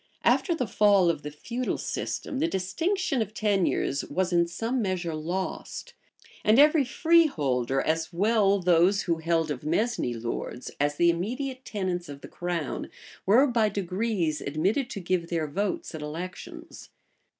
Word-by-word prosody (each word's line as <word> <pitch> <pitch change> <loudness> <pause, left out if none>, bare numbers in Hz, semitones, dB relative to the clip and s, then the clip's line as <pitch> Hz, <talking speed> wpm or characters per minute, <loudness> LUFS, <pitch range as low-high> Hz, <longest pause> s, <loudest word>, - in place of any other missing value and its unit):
After 345 - +3
the 255 - -1
fall 200 -3 +4
of 160 - -6
the 150 - -5
feudal 235 +12 -3
system, 270 - -4
the 320 - +2
distinction 315 - -1
of 215 0 -4
tenures 195 -9 +1
was 180 +3 -1
in 170 0 +3
some 230 +8 -2
measure 185 -5 -2
lost; 185 - -4 0.5
and 215 +2 +4
every 300 +1 +6
freeholder, 170 - +2
as 160 +3 -1
well 200 +2 +3
those 180 +2 +3
who 170 -2 0
held 165 -1 0
of 135 -2 -5
mesne 165 - 0
lords, 120 +1 -5
as 145 +1 +1
the 170 +2 +4
immediate 255 +9 -4
tenants 180 -5 -3
of 140 -1 -9
the - - -9
crown, 175 -4 -4 0.4
were 235 +8 +6
by 235 -5 +2
degrees 185 -5 -1
admitted 190 - 0
to - - -5
give 175 -2 -1
their 165 -2 0
votes 205 - -3
at 160 - -6
elections. 165 +5 -8
185 Hz, 150 wpm, -27 LUFS, 165-230 Hz, 0.5 s, every